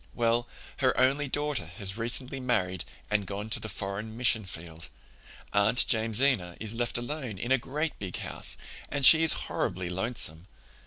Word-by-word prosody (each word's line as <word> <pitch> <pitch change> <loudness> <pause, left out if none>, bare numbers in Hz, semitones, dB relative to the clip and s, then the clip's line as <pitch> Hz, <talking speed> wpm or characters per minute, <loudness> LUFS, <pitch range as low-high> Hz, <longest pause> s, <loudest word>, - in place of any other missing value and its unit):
Well, 120 0 0 0.3
her 130 -2 +1
only 135 +3 +2
daughter 145 - -2
has 95 -1 0
recently 125 +4 -1
married 95 -9 -1 0.3
and 105 -2 0
gone 105 +2 -6
to - - +2
the 110 - -7
foreign 105 +3 -6
mission 115 -3 +2
field. 85 -2 -9 0.6
Aunt 105 +4 +5
Jamesina 110 -5 +1
is 110 0 -1
left 120 0 -1
alone 120 -3 -5
in 120 +7 -5
a 135 - +4
great 150 +6 -3
big 95 -3 -5
house, - - +1 0.3
and 140 -2 0
she 160 +5 +9
is 165 - +8
horribly 90 -1 -3
lonesome. 95 -4 -1
115 Hz, 160 wpm, -28 LUFS, 100-130 Hz, 0.6 s, she